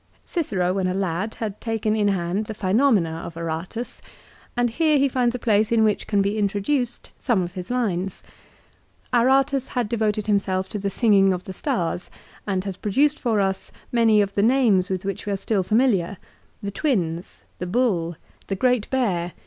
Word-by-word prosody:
Cicero 190 - 0
when 190 -1 0
a 185 - -1
lad 190 +2 -2
had 215 -3 -5
taken 220 -2 -1
in 210 -2 +2
hand 190 +1 0
the 220 - -5
"Phenomena" 195 -5 +2
of 165 - -8
Aratus, 170 +8 -5 0.6
and 240 -1 +2
here 310 +3 +3
he 280 0 +4
finds 250 -2 +1
a - - -1
place 215 -2 +2
in 225 -1 +4
which 215 -2 +1
can 200 -2 +2
be 205 +2 -1
intro 205 0 0
duced 245 +2 -2
some 225 -8 +1
of 175 0 -6
his 180 0 -7
lines. 195 -7 -1 0.9
Aratus 265 +2 +3
had 245 -3 -1
devoted 215 -2 0
himself 190 -2 0
to 210 - -4
the 200 0 -1
singing 195 -3 +4
of 180 0 -4
the 190 - -7
stars, 180 - -2 0.4
and 190 -2 0
has 195 -2 -5
produced 285 +9 +1
for 225 -4 +1
us 190 -1 -1 0.2
many 225 -3 +4
of 200 0 -5
the 200 - +1
names 220 -5 +3
with 185 0 -3
which 195 +1 -4
we 205 - 0
are - - -1
still 195 +1 0
familiar. 205 -3 +2 0.2
" - - -34
The 200 - -3
Twins." 180 - -2 0.2
"The 180 - -3
Bull" 180 -6 +1 0.3
"The 195 - -1
Great 245 +1 +1
Bear." 185 -10 0
205 Hz, 190 wpm, -23 LUFS, 185-240 Hz, 0.9 s, he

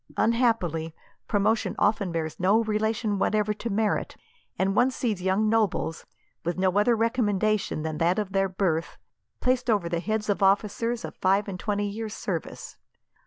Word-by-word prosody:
Unhappily, 205 -9 +1 0.3
promotion 210 +2 +1
often 205 -3 +1
bears 160 -2 -3
no 200 +5 +3
relation 215 -1 -1
whatever 210 +1 +1
to 230 +2 -5
merit; 210 0 -1 0.4
and 195 +1 +1
one 245 +4 +4
sees 225 -7 -2
young 190 +4 +1
nobles, 215 -7 0 0.4
with 175 +2 -2
no 185 0 +1
other 235 +3 +3
recommendation 215 -6 0
than 155 -1 -3
that 170 +2 +2
of 205 -3 -2
their 195 0 +1
birth, 180 -4 -1 0.4
placed 250 0 +1
over 205 -6 +2
the 170 0 -1
heads 215 +4 -2
of 205 -1 0
officers 210 +4 +1
of - - -8
five 195 +2 +2
and 185 -2 -5
twenty 205 -1 -1
years 215 +1 -5
service. - - -5
205 Hz, 160 wpm, -26 LUFS, 185-220 Hz, 0.4 s, one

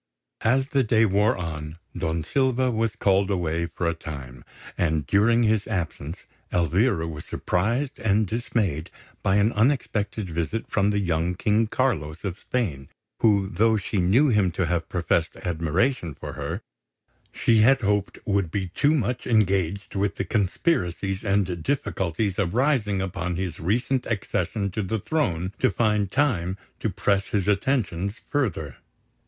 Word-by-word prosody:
As 130 +4 +2
the 140 -4 +2
day 110 0 +4
wore 105 +1 +2
on, 80 -2 -5 0.2
Don 80 -1 -1
Silva 130 +1 +1
was 115 -1 0
called 100 -2 +2
away 85 -3 0
for 85 +1 -3
a 85 - +1
time; 70 -7 -8 0.3
and, 80 -3 0
during 115 +4 +3
his 110 -2 +2
absence, 85 -4 -4 0.3
Elvira 85 - +2
was 75 -2 -6
surprised 120 +10 -1
and 110 0 +2
dismayed 100 -7 -1 0.3
by 95 - +2
an 105 +3 +3
unexpected 110 -5 0
visit 85 +7 -2
from 100 0 +1
the 105 - +1
young 85 -2 0
King 105 +4 +2
Carlos 90 - -1
of 95 -3 -4
Spain, 80 - -2 0.3
who, 100 -4 +3
though 110 +2 +2
she 100 0 -2
knew 110 +12 +4
him 105 -5 +3
to 90 +2 -1
have 85 0 -1
professed 85 -2 0
admiration 85 - 0
for - - -7
her, - - -4 0.7
she 115 -2 +3
had 130 +5 +5
hoped 105 -2 0
would 100 -4 +1
be 95 +1 -2
too 145 - +2
much 125 -2 -1
engaged 100 -4 +1
with 100 0 0
the 100 - -2
conspiracies 95 - 0
and 100 -4 0
difficulties 100 - -1
arising 105 - +1
upon 90 -2 -3
his 90 -2 -4
recent 120 +8 0
accession 100 -1 -1
to 105 - -2
the 105 +3 -1
throne 95 - -1
to 130 - +4
find 105 -3 +1
time 95 -11 +1 0.2
to 110 - -1
press 100 0 0
his 100 -2 -1
attentions 100 -3 0
further. 85 - -1
100 Hz, 150 wpm, -25 LUFS, 85-115 Hz, 0.7 s, had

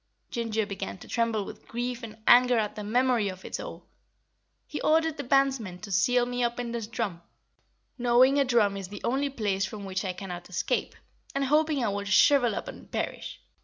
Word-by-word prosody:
Ginger 225 -2 -1
began 200 -2 -5
to - - -13
tremble 230 -3 0
with - - -11
grief 240 +1 -3
and 220 -2 -9
anger 245 0 +6
at 210 -2 0
the 210 - -5
memory 240 -1 +2
of 185 0 -9
it - - -4
all. - - -8 0.8
"He - - -6
ordered 320 0 +2
the 285 - -4
bandsmen 265 -8 +1
to 210 - -8
seal 240 +6 +3
me 245 0 -2
up 240 0 -1
in 240 -1 -3
this 230 -2 -4
drum, 215 -7 -3 0.8
knowing 250 +3 +5
a - - +5
drum 230 -6 +2
is 195 -2 -6
the 205 +2 -9
only 275 +3 0
place 205 -7 -1
from 205 -1 -5
which 190 +1 -2
I 185 -2 -2
cannot 180 -2 -7
escape, 180 - -1 0.4
and 275 0 +1
hoping 300 -1 +2
I - - +1
would 200 0 -3
shrivel 245 0 +5
up - - -5
and - - -10
perish. - - -4
230 Hz, 200 wpm, -28 LUFS, 200-250 Hz, 0.8 s, anger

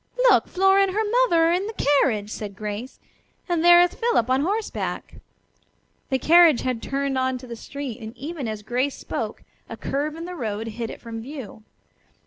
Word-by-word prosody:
Look, - - +4
Flora 385 +1 +3
and 390 -1 +1
her 435 +2 +1
mother 415 -8 +3
are - - +3
in 365 +4 0
the 445 - -5 0.3
carriage!" 210 -5 0
said 205 -3 -6
Grace, 210 +5 -6 0.5
"and 345 -3 0
there 345 0 +8
is 355 - 0
Philip 455 - +1
on 260 +1 +3
horseback." 410 +7 -3 0.9
The 265 - +2
carriage 325 -1 +6
had 250 -3 -2
turned 275 -1 -1
on 260 0 0
to 255 - -11
the 235 -2 -7
street, 265 0 -7
and 220 +2 -9
even 290 -2 -5
as 215 -1 -5
Grace 250 +5 -1
spoke - - -5 0.3
a - - -7
curve 295 +2 -2
in 330 +1 -7
the 360 - -6
road 220 -8 -4
hid 225 +1 -5
it - - -8
from 225 -1 -7
view. 255 -4 -9
275 Hz, 190 wpm, -24 LUFS, 230-345 Hz, 0.9 s, there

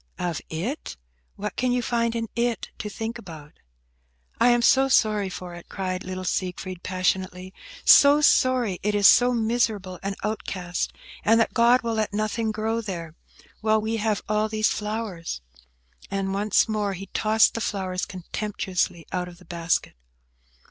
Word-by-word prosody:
"Of 175 -4 -2
it?" 180 - -4 0.4
What 210 -1 -5
can 255 0 0
you 245 0 +1
find 235 0 0
in 230 -1 -2
it 235 -1 -1
to 210 - -4
think 225 +3 -5
about?" 160 -7 -12 0.8
"I 235 +2 +5
am 240 0 +3
so 270 +2 +5
sorry 215 -6 +2
for 180 -1 -7
it!" 175 0 -11
cried 185 -1 -3
little 185 0 -5
Siegfried, 185 0 -3
passionately; 185 0 -2 0.3
"so 285 +1 +8
sorry 255 -9 +3
it 210 +1 0
is 205 -1 +2
so 245 +4 +7
miserable 220 -5 0
and 195 0 -3
outcast, 185 -4 -3 0.3
and 225 +1 +4
that 230 - +1
God 240 +2 +4
will 230 -1 -1
let 215 -2 -1
nothing 215 +1 -1
grow 220 +2 -1
there, 170 -7 -6 0.5
while 220 0 +2
we 220 +1 -2
have 215 -1 -1
all 215 +1 +1
these 215 0 +2
flowers!" 210 - -4 0.7
And 195 -1 -2
once 205 +2 +2
more 210 -2 -1
he 195 +1 -7
tossed 220 0 +4
the 230 - -3
flowers 185 -3 -2
contemptuously 185 -2 -3
out 180 -1 -2
of 175 -1 -12
the 180 - -18
basket. 170 -1 -1
210 Hz, 160 wpm, -25 LUFS, 185-225 Hz, 0.8 s, so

